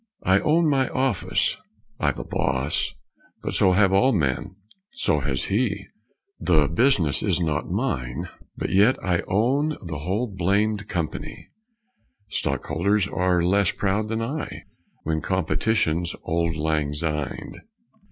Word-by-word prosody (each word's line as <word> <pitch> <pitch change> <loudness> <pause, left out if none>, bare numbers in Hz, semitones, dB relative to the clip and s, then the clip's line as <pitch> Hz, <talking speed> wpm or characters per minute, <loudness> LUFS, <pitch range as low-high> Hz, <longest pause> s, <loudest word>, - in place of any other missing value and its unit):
I 95 +1 +4
own 160 +6 +3
my 135 -3 +2
office 130 -7 0 0.4
(I've - - +1
a - - -4
boss, 70 +2 -1 0.5
But - - -3
so 95 - +4
have 95 0 +4
all 130 +8 +4
men 75 - -1 0.4
so 255 - +1
has - - -1
he); - - 0 0.5
The 75 -4 +3
business 85 - +2
is - - +1
not 80 -4 -1
mine, 60 -1 -2 0.3
but - - -3
yet 105 +7 +5
I 90 -2 +1
own 135 +10 +1
the 80 -4 -5
whole 95 - -1
blamed 100 +1 0
company; 85 -4 -4 0.8
Stockholders 100 +6 0
are 90 -2 +1
less 95 +1 +3
proud 105 +2 0
than 110 +1 -2
I 145 +7 -4 0.4
When 80 0 -1
competition's 85 -1 0
auld 85 0 0
lang 75 -1 0
syned. 75 -2 -3
95 Hz, 130 wpm, -24 LUFS, 80-110 Hz, 0.8 s, yet